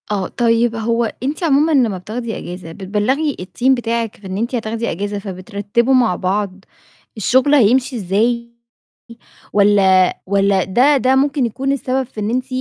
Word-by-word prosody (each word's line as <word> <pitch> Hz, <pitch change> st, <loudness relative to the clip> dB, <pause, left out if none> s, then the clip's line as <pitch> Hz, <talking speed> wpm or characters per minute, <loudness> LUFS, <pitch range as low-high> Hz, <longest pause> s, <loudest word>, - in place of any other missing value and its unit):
آه، 195 Hz, -3 st, -1 dB
طيب 230 Hz, -1 st, +1 dB
هو 230 Hz, +1 st, 0 dB, 0.2 s
أنتِ 290 Hz, +6 st, -3 dB
عمومًا 305 Hz, 0 st, +3 dB
لمّا 240 Hz, -9 st, +2 dB
بتاخدي 225 Hz, +5 st, -5 dB
إجازة 175 Hz, -2 st, -8 dB
بتبلغي 210 Hz, -, -1 dB
الteam 200 Hz, +8 st, -1 dB
بتاعك 235 Hz, -3 st, -1 dB
في 200 Hz, -, -12 dB
إن 190 Hz, +1 st, -4 dB
أنتِ 235 Hz, +4 st, -2 dB
هتاخدي 230 Hz, 0 st, -3 dB
إجازة، 205 Hz, +3 st, -4 dB
فبترتّبوا 205 Hz, +5 st, -2 dB
مع 240 Hz, -8 st, +3 dB
بعض 195 Hz, 0 st, -3 dB, 0.5 s
الشغل 260 Hz, +7 st, +3 dB
هيمشي 255 Hz, +1 st, +3 dB
إزاي؟ 235 Hz, +4 st, -1 dB, 1.0 s
والّا 195 Hz, -2 st, +3 dB
والّا 195 Hz, -1 st, +2 dB
ده 255 Hz, +9 st, +3 dB
ده 260 Hz, 0 st, +2 dB
ممكن 275 Hz, -1 st, +1 dB
يكون 265 Hz, +4 st, -2 dB
السبب 265 Hz, -1 st, -1 dB
في 230 Hz, -3 st, -9 dB
إن 210 Hz, +1 st, -2 dB
أنتِ 255 Hz, +2 st, -1 dB
230 Hz, 150 wpm, -18 LUFS, 200-255 Hz, 1.0 s, عمومًا